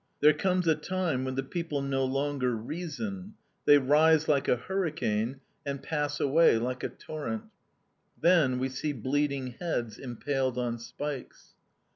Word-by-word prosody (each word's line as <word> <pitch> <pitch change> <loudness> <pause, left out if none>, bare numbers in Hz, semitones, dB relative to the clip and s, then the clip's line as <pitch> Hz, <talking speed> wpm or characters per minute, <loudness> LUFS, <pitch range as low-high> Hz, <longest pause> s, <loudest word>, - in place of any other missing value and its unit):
There 150 +1 +7
comes 180 +2 +1
a 160 - +6
time 155 -3 -1
when 130 0 -3
the 135 - -1
people 150 -1 -3
no 135 -1 0
longer 135 -2 0
reason; 180 - -5 0.3
they 145 - +8
rise 155 +3 +4
like 140 -2 +2
a - - +4
hurricane, 135 - -1 0.2
and 140 -2 -3
pass 150 -2 -1
away 145 -2 +5
like 125 +2 -3
a - - -1
torrent. 155 +9 -5 0.8
Then 165 -8 +4
we 130 +1 0
see 140 +3 -3
bleeding 135 0 -1
heads 120 -11 -2
impaled 130 0 -2
on 120 -1 -1 0.2
pikes. 145 -3 -5
145 Hz, 145 wpm, -29 LUFS, 130-160 Hz, 0.8 s, they